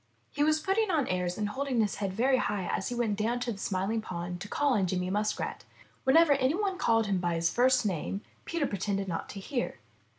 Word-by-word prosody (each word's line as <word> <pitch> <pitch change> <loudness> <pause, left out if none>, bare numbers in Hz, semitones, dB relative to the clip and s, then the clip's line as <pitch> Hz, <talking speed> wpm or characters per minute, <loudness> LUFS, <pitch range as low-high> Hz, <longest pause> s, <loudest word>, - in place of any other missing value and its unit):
He 290 - 0
was 310 +1 +3
putting 390 +6 +1
on 310 -7 +1
airs 180 -1 -1
and 210 -1 -1
holding 265 +1 -1
his 210 -3 +1
head 200 -2 -2
very 255 +7 +2
high 205 -6 -1
as 190 - -2
he 245 - -3
went 225 -4 0
down 235 +3 0
to 245 - -1
the 200 - -7
Smiling 200 +4 -1
Pool 175 -3 -5
to 195 - -6
call 285 +4 +1
on 195 -5 +2
Jerry 180 0 -1
Muskrat. 210 +2 -1 0.4
Whenever 310 +3 +6
any 270 +2 +2
one 390 -2 -1
called 225 -6 +3
him 195 -2 0
by 175 -1 0
his 165 0 +1
first 255 0 +4
name, 195 +1 -2 0.2
Peter 335 -3 -1
pretended 200 -2 -2
not 165 -3 -4
to 200 - -7
hear. 245 +5 -3
215 Hz, 225 wpm, -30 LUFS, 190-270 Hz, 0.4 s, Whenever